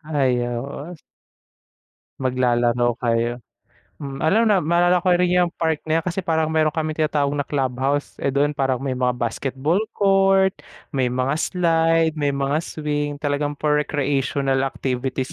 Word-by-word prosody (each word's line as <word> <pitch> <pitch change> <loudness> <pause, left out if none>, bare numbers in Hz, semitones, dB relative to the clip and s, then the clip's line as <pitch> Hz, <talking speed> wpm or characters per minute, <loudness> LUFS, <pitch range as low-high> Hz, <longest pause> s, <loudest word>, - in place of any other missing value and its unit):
Ayaw, 120 -3 0 0.2
oh 175 - -8 1.3
Maglalaro 120 -2 +1
kayo, 120 +1 0 0.6
hmm, 135 -2 -7
alam 210 +9 +3
na 205 -4 +3
maalala 175 +3 +3
ko 185 - -1
rin 180 0 +1
yung 175 - +2
part 160 -2 0
na 160 - +3
yan - - -15
kasi 180 +1 -2
parang 160 -3 0
meron 155 -1 +3
kaming 155 -1 -1
tinatawag 145 -2 +1
na 145 -1 -3
club 135 -3 0
house, 140 +2 0
eh, - - 0
doon 140 +2 +1
parang 135 -3 0
may 135 0 -3
mga 125 -1 0
basketball 135 - -1 0.2
court, 195 -1 +4 0.4
may 130 -3 +1
mga 130 +2 -1
slide, 165 -2 +2
may 145 -2 -1
mga 140 +2 0
swing, 150 -2 -3
talagang 145 0 -2
for 150 0 +1
recreational 135 -2 0
activities 130 0 -3
145 Hz, 155 wpm, -22 LUFS, 130-160 Hz, 1.3 s, court